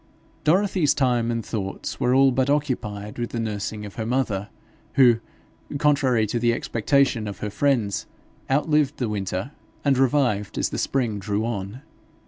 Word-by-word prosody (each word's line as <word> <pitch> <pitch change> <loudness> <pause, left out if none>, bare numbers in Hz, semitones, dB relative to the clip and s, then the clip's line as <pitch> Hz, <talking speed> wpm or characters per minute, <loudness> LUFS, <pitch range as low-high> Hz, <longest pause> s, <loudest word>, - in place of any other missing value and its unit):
Dorothy's 180 -1 +3
time 120 -4 +1
and 115 -1 -2
thoughts 100 -4 -4
were 125 +1 +2
all 135 0 +6
but 130 +2 +1
occupied 120 -8 -2
with 120 - -2
the 115 - -4
nursing 105 -1 -3
of 100 - -10
her 110 - -2
mother, 115 -6 -1 0.4
who, 120 -4 +6 0.6
contrary 140 -6 +3
to 115 +3 -2
the 120 0 +2
expectation 120 0 +1
of 100 -2 -5
her 105 - -4
friends, 115 -7 0 0.4
outlived 150 +1 +2
the 125 - -1
winter, 100 +3 -3 0.3
and 135 -2 +3
revived 125 -7 +1
as - - +1
the - - -4
spring 120 -6 0
drew 105 +3 -1
on. 110 +3 -4
120 Hz, 155 wpm, -24 LUFS, 105-135 Hz, 0.6 s, all